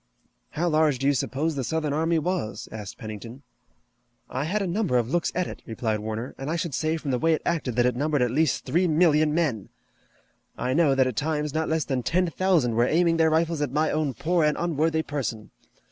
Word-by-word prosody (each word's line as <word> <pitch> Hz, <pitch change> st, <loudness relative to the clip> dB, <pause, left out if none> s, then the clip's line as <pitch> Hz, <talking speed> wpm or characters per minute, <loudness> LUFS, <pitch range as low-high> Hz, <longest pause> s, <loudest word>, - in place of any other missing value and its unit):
"How 175 Hz, +3 st, -1 dB
large 155 Hz, -4 st, +3 dB
do 135 Hz, -, -3 dB
you 140 Hz, -, +4 dB
suppose 145 Hz, +4 st, -1 dB
the 135 Hz, -, -2 dB
Southern 155 Hz, +1 st, -1 dB
army 165 Hz, +2 st, +1 dB
was?" 170 Hz, -7 st, -2 dB
asked 105 Hz, -3 st, -7 dB
Pennington. 115 Hz, +5 st, -8 dB, 0.9 s
"I 130 Hz, +3 st, -2 dB
had 200 Hz, +5 st, 0 dB
a -, -, -1 dB
number 180 Hz, -, 0 dB
of 120 Hz, +1 st, -1 dB
looks 175 Hz, -1 st, +1 dB
at 180 Hz, 0 st, +1 dB
it," -, -, -8 dB
replied 110 Hz, -1 st, -2 dB
Warner, 110 Hz, +3 st, -5 dB
"and 135 Hz, +2 st, -4 dB
I 165 Hz, -, 0 dB
should 170 Hz, -4 st, -3 dB
say 155 Hz, +4 st, 0 dB
from 150 Hz, -3 st, -4 dB
the 125 Hz, -, 0 dB
way 165 Hz, +3 st, +3 dB
it -, -, -7 dB
acted 150 Hz, -8 st, -1 dB
that 120 Hz, 0 st, +3 dB
it 125 Hz, -1 st, +1 dB
numbered 145 Hz, 0 st, +1 dB
at 120 Hz, -, 0 dB
least 150 Hz, 0 st, +1 dB
three 170 Hz, +8 st, +2 dB
million 155 Hz, -2 st, +3 dB
men. 150 Hz, -, -1 dB, 0.9 s
I 125 Hz, +1 st, -1 dB
know 150 Hz, -3 st, +3 dB
that 130 Hz, -1 st, +4 dB
at 125 Hz, -4 st, -3 dB
times 150 Hz, -1 st, -1 dB
not 160 Hz, 0 st, -1 dB
less 160 Hz, -1 st, 0 dB
than 130 Hz, -2 st, -1 dB
ten 180 Hz, +8 st, +1 dB
thousand 170 Hz, -10 st, +2 dB
were 120 Hz, +2 st, +3 dB
aiming 165 Hz, +2 st, +2 dB
their 160 Hz, -1 st, +4 dB
rifles 160 Hz, 0 st, +1 dB
at 145 Hz, -, -1 dB
my 155 Hz, +3 st, +1 dB
own 150 Hz, -4 st, -1 dB
poor 170 Hz, 0 st, +1 dB
and 150 Hz, 0 st, +2 dB
unworthy 160 Hz, -1 st, 0 dB
person. 125 Hz, -8 st, -4 dB
150 Hz, 220 wpm, -25 LUFS, 125-165 Hz, 0.9 s, you